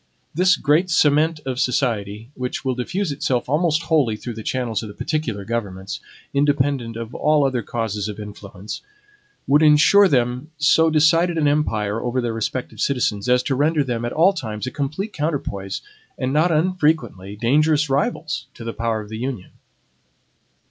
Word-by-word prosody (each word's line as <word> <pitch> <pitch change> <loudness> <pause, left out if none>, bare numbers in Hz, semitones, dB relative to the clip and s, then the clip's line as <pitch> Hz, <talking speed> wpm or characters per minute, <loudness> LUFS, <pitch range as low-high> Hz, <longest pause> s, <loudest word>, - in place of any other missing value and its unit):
This 180 +2 +4
great 155 +6 +2
cement 155 -1 +3
of 130 -1 -3
society, 115 -4 -1
which 125 +1 -4
will 130 - +1
diffuse 160 +9 -2
itself 130 -3 -1
almost 160 +3 +1
wholly 145 -10 +2
through 120 +3 -6
the 110 - -7
channels 115 -3 -2
of 110 - -7
the 100 - -10
particular 115 -11 -3
governments, 100 -4 -4 0.3
independent 140 -4 +1
of 115 0 -6
all 150 -1 +2
other 130 -3 0
causes 110 -2 -3
of 105 0 -6
influence, 105 -1 -8 0.6
would 145 +3 +4
insure 155 +7 +6
them 125 -1 0
so 160 +2 +4
decided 165 +2 +3
an 150 -2 +2
empire 115 -8 0
over 125 +1 -1
their 120 -2 -1
respective 115 +3 -4
citizens 125 -5 0
as 125 0 +4
to 135 - -1
render 150 +3 +2
them 120 -3 -3
at 120 - -2
all 175 +7 +4
times 110 - -5
a 130 - -4
complete 155 +9 -3
counterpoise, 140 -11 -3 0.3
and, 130 0 -2
not 160 +4 +3
unfrequently, 155 - 0
dangerous 150 +7 +2
rivals 150 - -1
to - - -9
the 115 0 -4
power 115 -1 -1
of 105 - -11
the 110 0 -6
Union. 125 -6 -5
130 Hz, 165 wpm, -21 LUFS, 115-155 Hz, 0.6 s, insure